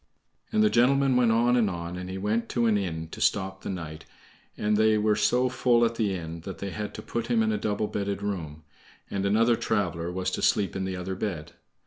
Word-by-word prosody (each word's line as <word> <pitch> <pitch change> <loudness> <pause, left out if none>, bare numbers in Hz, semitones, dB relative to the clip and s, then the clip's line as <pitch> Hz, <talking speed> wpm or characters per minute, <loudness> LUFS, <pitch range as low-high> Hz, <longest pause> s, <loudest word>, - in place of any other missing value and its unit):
And 215 -1 +3
the 215 - +5
gentleman 135 +2 +4
went 120 -2 +4
on 120 +2 +3
and 115 -4 +3
on, 85 -1 -5
and 90 0 -6
he 95 - -4
went 105 +4 -1
to 120 -1 +1
an 110 -2 +3
inn 80 -5 -3
to - - -9
stop 95 -1 0
the - - -6
night, 80 -4 -6 0.5
and 105 0 +1
they 110 0 +4
were 105 0 +2
so 125 +4 +2
full 125 -2 +3
at 115 - 0
the 105 -4 0
inn 85 -1 -6
that 95 +3 -7
they 100 -1 -5
had 105 +1 -5
to - - -7
put 115 - -3
him 230 -2 +2
in 220 - +1
a 215 - 0
double 105 0 -1
bedded 100 -1 -3
room, 80 -7 -4 0.5
and 100 0 -1
another 115 +3 +4
traveler 90 -7 -1
was 90 +1 -2
to - - -3
sleep 100 -5 +2
in 95 0 -2
the 95 0 -3
other 90 +1 -4
bed. 95 -5 -4
105 Hz, 235 wpm, -27 LUFS, 90-115 Hz, 0.5 s, the